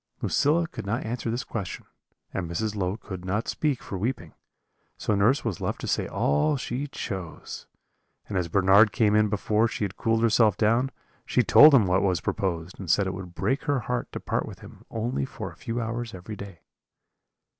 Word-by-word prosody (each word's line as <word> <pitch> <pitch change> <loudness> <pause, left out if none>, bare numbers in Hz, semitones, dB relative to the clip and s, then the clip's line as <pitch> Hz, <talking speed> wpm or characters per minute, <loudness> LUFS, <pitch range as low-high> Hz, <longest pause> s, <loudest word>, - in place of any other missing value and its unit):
"Lucilla 160 +4 +2
could - - -7
not 105 +4 -2
answer 115 +1 -3
this 120 +4 -2
question, 105 -8 -5 0.5
and 85 -3 -3
Mrs. 105 +5 -2
Low 95 0 -1
could 95 -6 -8
not 105 +5 -2
speak 150 -5 -1
for 95 - -5
weeping; 100 - -3 0.6
so 110 - -1
nurse 110 +8 +3
was 105 -8 -2
left - - -2
to - - -4
say - - 0
all 75 - +1
she 130 +2 -3
chose; 95 - -6 0.6
and 100 - -5
as 90 -2 0
Bernard 100 +4 +5
came 105 -1 +2
in 105 0 +4
before 105 +2 +1
she 110 - -4
had 100 -2 -3
cooled 115 0 +1
herself 110 -3 +4
down, 115 +5 +2 0.3
she 125 - +2
told 150 +5 +8
him 115 -7 +5
what 95 +1 +2
was 95 -4 +1
proposed, 85 -2 -3
and 95 -4 -7
said 100 +5 +3
it 95 - -2
would 90 -2 -8
break 130 - -1
her 140 -3 +1
heart 125 0 -3
to - - -5
part - - -2
with - - -10
him - - -14
only 115 - -2
for - - -6
a - - -16
few 115 +1 -4
hours 115 0 -4
every 95 +4 -8
day. 100 -4 -10
105 Hz, 200 wpm, -26 LUFS, 95-120 Hz, 0.6 s, told